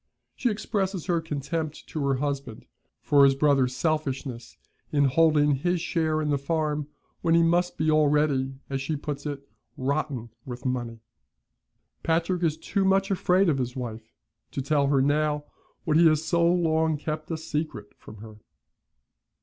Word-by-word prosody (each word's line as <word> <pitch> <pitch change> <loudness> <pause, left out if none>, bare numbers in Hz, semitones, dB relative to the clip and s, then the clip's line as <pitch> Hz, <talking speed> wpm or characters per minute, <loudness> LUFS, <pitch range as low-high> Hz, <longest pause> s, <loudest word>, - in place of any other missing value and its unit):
She 250 - 0
expresses 200 -4 -2
her 175 -2 +1
contempt 155 0 -4
to 155 - -3
her 135 - +2
husband 140 -4 -4 0.4
for 140 -1 +5
his 135 -1 +5
brother's 135 -3 +2
selfishness 135 -5 -2 0.3
in 145 -1 +3
holding 150 0 +3
his 175 +5 0
share 160 -2 0
in 150 - 0
the 140 - +1
farm, 150 0 -1 0.3
when 165 -1 +3
he 170 - +5
must 175 +2 +1
be 155 +1 +2
already, 150 -3 +2
as 135 -1 -3
she 150 +4 -2
puts 145 0 -5
it, 140 -1 -6 0.3
'rotten 135 -3 -2
with 125 0 -8
money.' 120 -3 -3 1.0
Patrick 170 +2 0
is 160 -3 +1
too 200 - -1
much 195 +1 +2
afraid 185 0 +3
of 145 -5 +2
his 125 -1 -3
wife 115 -3 -6 0.4
to - - -3
tell 140 0 +2
her 140 -1 +3
now 150 +1 +1 0.4
what 155 -2 +2
he 170 0 +7
has 155 0 +2
so 170 +1 +3
long 160 -3 +2
kept 155 +1 -5
a 165 - -2
secret 155 -7 -4
from 110 - -13
her. 110 -1 -11
150 Hz, 160 wpm, -26 LUFS, 135-165 Hz, 1.0 s, he